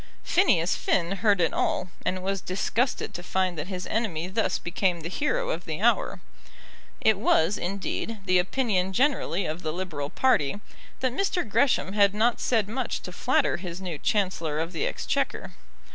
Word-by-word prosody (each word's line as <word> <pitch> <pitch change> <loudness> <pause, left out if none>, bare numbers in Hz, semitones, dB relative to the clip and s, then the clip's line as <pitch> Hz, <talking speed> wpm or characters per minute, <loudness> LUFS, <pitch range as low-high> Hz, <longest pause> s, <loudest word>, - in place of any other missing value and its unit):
Phineas 185 - +3
Finn 180 +2 0
heard 205 -1 +3
it 165 - +2
all, 185 - 0
and 185 0 -1
was 195 0 -1
disgusted 220 +8 -1
to 175 - -5
find 185 0 0
that 155 +1 -4
his 185 -2 -5
enemy 190 -7 -1
thus 215 +4 0
became 175 0 -1
the 165 - -5
hero - - 0
of - - -4
the - - -4
hour. - - +2 0.8
It 220 -3 +4
was, 180 -2 +3
indeed, 200 +4 -3
the 185 -1 +4
opinion 190 -2 0
generally 245 - +1
of 160 +3 -3
the 155 - -2
Liberal 155 -5 -4
party 205 - +2 0.4
that 255 -2 +1
Mr. 360 - 0
Gresham 225 -3 +2
had 200 -1 +4
not 230 +3 +2
said 225 -5 +2
much 245 +3 -3
to 180 - -6
flatter - - +1
his 175 -1 -6
new 175 -6 -5
Chancellor 170 -7 0
of 165 +2 -2
the 435 - -1
Exchequer. - - -2
190 Hz, 170 wpm, -26 LUFS, 175-225 Hz, 0.8 s, It